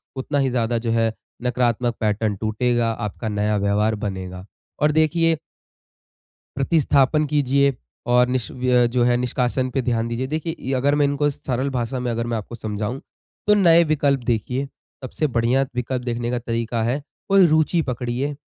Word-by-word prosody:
उतना 140 +2 -1
ही 135 -1 +2
ज़्यादा 120 -1 0
जो - - +1
है, 115 -1 +1 0.3
नकारात्मक 120 -1 0
पैटर्न 105 -1 0
टूटेगा, 115 +3 0
आपका 110 0 -4
नया 105 0 0
व्यवहार 105 +2 +1
बनेगा। 95 -1 -6 0.4
और 150 +1 +4
देखिए, 160 +1 +2 1.2
प्रतिस्थापन 145 0 +2
कीजिए 140 -1 +2 0.3
और 125 0 +4
निष 125 -1 -1
व्य 125 -1 +2
जो 120 0 +1
है, 120 0 +3
निष्कासन 125 +1 -1
पे 130 +2 -1
ध्यान 115 -2 0
दीजिए। 120 +3 -3
देखिए, 155 -2 -4
अगर 140 +3 +2
मैं 145 -1 +3
इनको 145 +1 +1
सरल 135 -1 -3
भाषा 125 -1 -2
में 125 -1 -2
अगर 115 +1 -2
मैं 115 -1 -1
आपको 110 +2 -7
समझाऊँ, 110 +3 -4 0.5
तो 210 - +6
नए 170 -4 +6
विकल्प 145 -3 +1
देखिए। 125 +3 -1 0.4
सबसे 140 +4 -2
बढ़िया 120 +1 +1
विकल्प 125 +1 -2
देखने 120 -1 -2
का 125 - -1
तरीका 115 -1 -2
है, 125 +6 -1 0.3
कोई 195 -1 +6
रुचि 155 +2 +2
पकड़िए, 125 +2 -3
125 Hz, 160 wpm, -22 LUFS, 115-140 Hz, 1.2 s, तो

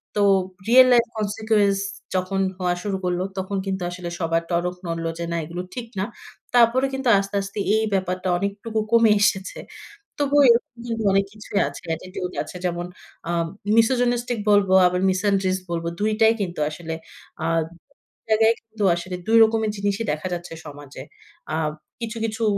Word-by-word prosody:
তো 205 - +2 0.5
real 255 +2 +8
life 235 -1 +4
consequence 210 -1 +1 0.4
যখন 185 +1 -1 0.2
হওয়া 180 -1 0
শুরু 200 -2 -1
করল। 180 0 0 0.2
তখন 190 +1 -2
কিন্তু 190 -1 -2
আসলে 175 -1 -6
সবার 165 0 0
টনক 175 +1 0
নড়ল 165 0 -3
যে 170 - -2
না 170 - -1
এগুলো 175 +3 -5
ঠিক 240 -2 -5
না। 190 - 0 0.5
তারপরে 245 +3 +5
কিন্তু 265 -1 -2
আস্তে, 200 +1 -4
আস্তে 195 +1 -6 0.2
এই 220 - +2
ব্যাপারটা 185 -1 -1
অনেকটুকু 200 +3 -3
কমে 230 -2 +6
এসেছে। 190 -2 +1 0.6
তবুও 285 0 +4
এরকম 235 0 +2
কিন্তু 225 -1 -2
অনেক 195 0 +3
কিছুই 210 -1 -3
আছে। - - -10
Attitude 180 +2 -6
আছে। - - -10
যেমন 175 0 -2 0.4
আ - - -1 0.5
misogynistic 245 0 +2
বলব 205 -2 +4 0.2
আবার 180 0 +1
misandrics 190 0 +1
বলব 170 -1 -2 0.2
২ 215 +1 +1
টাই 220 0 +6
কিন্তু 175 -5 -3
আসলে 160 +1 -6 0.5
আ - - +1 0.8
জায়গায় 220 +1 +5
কিন্তু 220 -2 -5
আসলে 180 +1 -5
২ 225 +1 +4
রকমের 220 -1 +1
জিনিসই 200 +2 -1
দেখা 155 +4 -3
যাচ্ছে 175 -1 -7
সমাজে। 145 -1 -10 0.5
আ - - 0 0.4
কিছু, 230 0 -4
কিছু 225 0 -2
200 Hz, 160 wpm, -23 LUFS, 180-225 Hz, 0.8 s, real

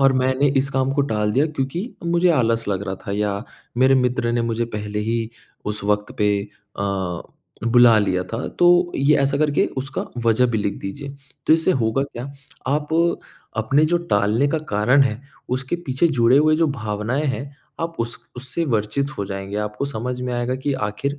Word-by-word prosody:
और 135 -1 +5
मैंने 130 +2 +2
इस 140 +1 0
काम 135 0 +1
को 140 0 +2
टाल 105 -5 0
दिया 140 +5 +3
क्योंकि 155 - -3 0.2
मुझे 170 +1 +3
आलस 115 -6 +1
लग 100 0 -1
रहा 95 - -2
था, 100 - -2
या 105 +1 -1 0.3
मेरे 130 +1 +5
मित्र 125 -2 +1
ने 120 -1 +1
मुझे 115 0 -1
पहले 105 0 -4
ही 115 +1 -1 0.4
उस 105 -1 -3
वक्त 105 0 0
पे 105 -1 +3 0.5
अ, 95 -3 -2 0.4
बुला 120 -1 +6
लिया 90 -3 +1
था 115 - -3
तो 175 - +6 0.3
ये 145 +2 +4
ऐसा 140 0 +2
करके 150 -1 +2
उसका 135 +1 -3 0.2
वजह 120 +3 +4
भी 110 - 0
लिख 100 -1 -1
दीजिए। 140 +9 -6 0.4
तो - - +6
इससे 165 +3 +3
होगा 110 +5 +1
क्या, 125 -3 -8 0.4
आप 150 +1 0 0.7
अपने 135 +8 +3
जो - - +5
टालने 105 +7 +3
का 160 - 0
कारण 120 +7 +4
है 120 -2 -1 0.4
उसके 135 +6 -3
पीछे 135 +6 +2
जुड़े 125 -2 +4
हुए 155 +1 +4
जो 165 0 +3
भावनाएँ 115 +2 -2
हैं, 140 +1 -4 0.2
आप 165 0 -3
उस 115 0 -3 0.2
उससे 130 +7 -3
वर्चित 120 +3 0
हो 100 - -1
जाएँगे। 95 +1 -5
आपको 105 +6 -4
समझ 125 0 -4
में 125 -1 -3
आएगा 120 +1 -1
कि 140 +2 -2 0.2
आखिर 140 +7 -3
125 Hz, 185 wpm, -22 LUFS, 105-140 Hz, 0.7 s, बुला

